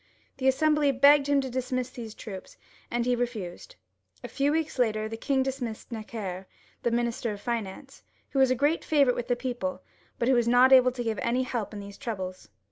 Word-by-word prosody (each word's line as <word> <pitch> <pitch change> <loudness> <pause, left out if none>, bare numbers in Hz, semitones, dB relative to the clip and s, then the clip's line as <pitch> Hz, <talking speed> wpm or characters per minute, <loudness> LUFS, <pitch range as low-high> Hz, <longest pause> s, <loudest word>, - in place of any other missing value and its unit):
The 260 - 0
Assembly 300 +1 +3
begged 280 +2 +5
him 285 -1 +4
to 265 - -4
dismiss 255 0 -2
these 225 -4 -8
troops, 195 -4 -9 0.3
and 240 0 -1
he 250 0 +2
re 245 0 +1
fused. 215 - -8 0.5
A - - -4
few 280 +1 0
weeks 315 -3 -1
after, 215 -3 +1
the 225 - -5
king 265 +3 0
dismissed 250 -4 -5
Necker, 210 -4 -6 0.3
the - - +1
Minister 235 -1 -1
of 200 - -9
Finance, 235 +2 -5 0.3
who 275 - 0
was 265 -1 +5
a 255 - +2
great 290 +6 +1
favourite 280 -5 +3
with 240 - -4
the 245 - +2
people, 255 +2 -4 0.3
but 235 - 0
who 265 - +5
was 240 -2 +2
not 250 +2 +6
able 255 -1 +7
to 245 -1 -4
give 225 -2 -2
any 245 +2 +1
help 240 -5 -3
in 210 - -7
these 200 0 -10
troubles. 190 - -5
245 Hz, 210 wpm, -27 LUFS, 225-265 Hz, 0.5 s, able